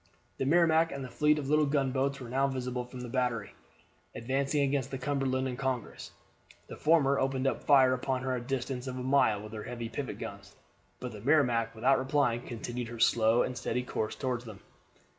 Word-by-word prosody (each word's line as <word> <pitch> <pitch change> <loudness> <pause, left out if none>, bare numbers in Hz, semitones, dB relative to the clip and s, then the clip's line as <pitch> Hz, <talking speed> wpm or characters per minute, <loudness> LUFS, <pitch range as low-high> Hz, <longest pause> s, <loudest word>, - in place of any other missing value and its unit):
The 135 - 0
Merrimac 165 +1 +4
and 140 -1 -5
the 125 - -10
fleet 150 0 +3
of 145 -3 -3
little 150 +1 +3
gunboats 140 -1 0
were 125 - -8
now 135 +3 +1
visible 125 -2 -3
from 125 0 -9
the 125 - -6
battery, 120 -4 -1 0.6
advancing 140 +4 0
against 140 -1 0
the 135 - -4
Cumberland 130 -1 -1
and 125 0 -5
Congress. 130 -4 -3 0.6
The - - -9
former 145 -3 +3
opened 135 0 0 0.2
fire 130 -3 +6
upon 130 0 -2
her 130 - -1
at 125 - -2
a - - -11
distance 130 0 -3
of 130 0 -4
a 125 - -4
mile 125 -6 +3
with 110 +1 -9
her 110 - -5
heavy 120 -2 -5
pivot 130 +3 -5
guns, - - -8 0.4
but 125 - -5
the 105 -2 -9
Merrimac, 120 -4 +2
without 130 +5 +3
replying, 130 -3 +1
continued 120 0 -5
her 115 0 -8
slow 115 +1 +4
and 125 - -3
steady 125 0 -2
course 110 -3 -3
toward 130 -3 -2
them. 110 -5 -11
130 Hz, 200 wpm, -30 LUFS, 120-140 Hz, 0.6 s, fire